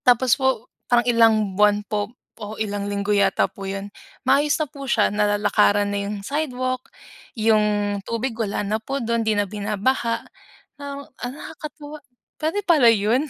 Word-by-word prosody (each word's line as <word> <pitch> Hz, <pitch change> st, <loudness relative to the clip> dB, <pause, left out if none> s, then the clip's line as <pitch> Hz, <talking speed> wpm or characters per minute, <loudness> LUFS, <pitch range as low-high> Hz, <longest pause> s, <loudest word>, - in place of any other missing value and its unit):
Tapos 250 Hz, 0 st, +5 dB
po 265 Hz, -4 st, 0 dB, 0.2 s
parang 240 Hz, -1 st, +4 dB
ilang 225 Hz, -4 st, +4 dB
buwan 210 Hz, +1 st, +4 dB
po 205 Hz, -1 st, -2 dB, 0.3 s
o 210 Hz, +1 st, -6 dB
ilang 205 Hz, -1 st, -3 dB
linggo 200 Hz, +1 st, -1 dB
yata 200 Hz, -1 st, +3 dB
po 195 Hz, -1 st, -7 dB
'yon, 195 Hz, +1 st, -5 dB, 0.3 s
maayos 290 Hz, +1 st, +3 dB
na 310 Hz, -, 0 dB
po 280 Hz, 0 st, -10 dB
siya. 215 Hz, -3 st, +2 dB
Nalalakaran 205 Hz, 0 st, +2 dB
na 200 Hz, -, -1 dB
yung 210 Hz, -, -3 dB
sidewalk, 255 Hz, -2 st, -2 dB, 0.5 s
yung 210 Hz, -2 st, +2 dB
tubig 230 Hz, +4 st, -3 dB
wala 215 Hz, -2 st, -2 dB
na 215 Hz, +2 st, -1 dB
po 270 Hz, +5 st, -3 dB
do'n. 235 Hz, -2 st, 0 dB
'Di 220 Hz, -2 st, +1 dB
na 205 Hz, -, +2 dB
binabaha 215 Hz, +4 st, -1 dB, 0.6 s
ng 280 Hz, 0 st, -5 dB
ah, 245 Hz, -1 st, -7 dB
nakakatuwa 300 Hz, +1 st, -9 dB, 0.4 s
pwede 320 Hz, +6 st, 0 dB
pala 300 Hz, -9 st, +6 dB
yun. 230 Hz, +7 st, +2 dB
220 Hz, 160 wpm, -23 LUFS, 205-260 Hz, 0.6 s, pala